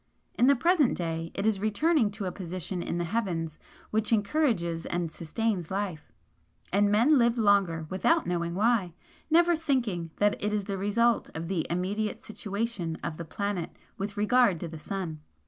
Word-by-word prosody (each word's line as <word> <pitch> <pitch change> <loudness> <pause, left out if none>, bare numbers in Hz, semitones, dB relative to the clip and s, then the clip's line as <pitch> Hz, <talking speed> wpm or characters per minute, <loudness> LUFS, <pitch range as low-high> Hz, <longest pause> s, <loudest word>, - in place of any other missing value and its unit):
In 245 - +3
the 280 - +6
present 305 0 +3
day 165 -1 -3
it 195 - -2
is 215 -3 +2
returning 220 - +2
to 205 0 -6
a 180 - -2
position 180 -1 -5
in 170 - -3
the 175 - 0
heavens 170 -5 -2 0.3
which 215 +1 0
encourages 205 - +1
and 175 -2 -2
sustains 180 +2 -2
life 190 -5 -4 0.6
and 205 +1 +4
men 250 +8 +5
live 235 0 +3
longer 195 -7 +3
without 185 +3 +2
knowing 170 -1 -1
why, 205 -4 +2 0.4
never 340 +2 +5
thinking 245 - -1
that 205 0 +1
it 210 - +1
is 210 -1 0
the 195 -1 -4
result 230 +4 +2
of 165 +1 -4
the 175 -3 -1
immediate 200 +5 -1
situation 205 -5 -3
of 160 -2 -4
the 170 - -6
planet 200 0 -3 0.2
with 200 +1 -5
regard 210 -3 +3
to 170 - -3
the 160 -1 -8
sun. 170 -3 -4
200 Hz, 170 wpm, -28 LUFS, 170-225 Hz, 0.6 s, the